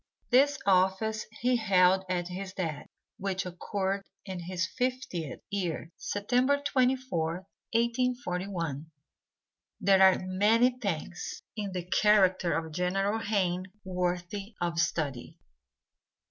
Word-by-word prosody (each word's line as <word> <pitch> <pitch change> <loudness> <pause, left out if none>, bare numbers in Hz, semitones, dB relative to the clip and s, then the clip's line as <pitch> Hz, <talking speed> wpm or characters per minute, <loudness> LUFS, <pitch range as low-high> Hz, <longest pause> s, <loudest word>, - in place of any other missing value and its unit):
This 280 +3 +5
office 195 +3 +2
he 250 +1 +3
held 190 -3 +4
at 175 -1 -1
his 190 +1 -6
death, 160 -6 -4 0.3
which 190 -1 -2
occurred 190 +2 -2 0.2
in 190 -2 -5
his 180 +1 -2
fiftieth 245 - -3
year, 175 -4 -2
September 250 +7 +1
24th, 255 - 0 0.3
1841. 195 - -1 0.9
There 195 -2 +4
are 190 -1 +7
many 215 +7 +4
things 175 -5 -4
in 205 -3 -4
the 180 -1 -3
character 185 -2 +3
of 160 -1 -5
General 195 +5 0
Hayne 185 -4 0 0.2
worthy 180 +3 -3
of 170 -1 -1
study. 150 -7 -1
190 Hz, 105 wpm, -29 LUFS, 180-220 Hz, 0.9 s, are